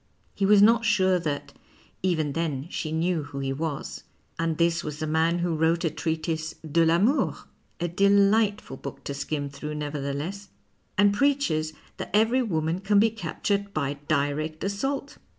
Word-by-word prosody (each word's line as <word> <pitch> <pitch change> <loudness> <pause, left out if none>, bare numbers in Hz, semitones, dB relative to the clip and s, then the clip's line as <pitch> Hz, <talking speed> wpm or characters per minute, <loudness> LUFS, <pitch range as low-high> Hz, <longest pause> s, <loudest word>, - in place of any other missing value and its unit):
He 195 - 0
was 205 0 +7
not 230 +1 +5
sure 190 -4 +3
that 150 -4 -4 0.5
even 160 -6 0
then 150 -4 -2
she 155 - -3
knew 165 +1 0
who 145 -1 -9
he 135 -1 -2
was. 150 0 -4 0.4
And 165 -1 0
this 170 0 +2
was 150 -1 -5
the 155 - -3
man 160 +2 +2
who 175 -1 0
wrote 160 +1 +1
a 160 - +1
treatise 160 0 -2
" - - -14
Dc 165 +2 +3
1 - - +4
'Amour 205 - +2 0.2
" - - -40
(a 175 - 0
delight 200 +3 +3
ful 135 - -9
book 140 - -8
to 140 - -4
skim 145 +1 -3
through, 150 +2 -6
nevertheless), 150 +6 -4 0.5
and 205 0 +5
preaches 235 - +1 0.2
that - - -5
every 225 +5 +4
woman 165 -6 -1
can 200 +1 +2
be 220 +2 +5
captured 200 0 -2
by 140 -2 -1
direct 155 +1 -1
assault 270 +9 -3
165 Hz, 175 wpm, -26 LUFS, 155-200 Hz, 0.5 s, was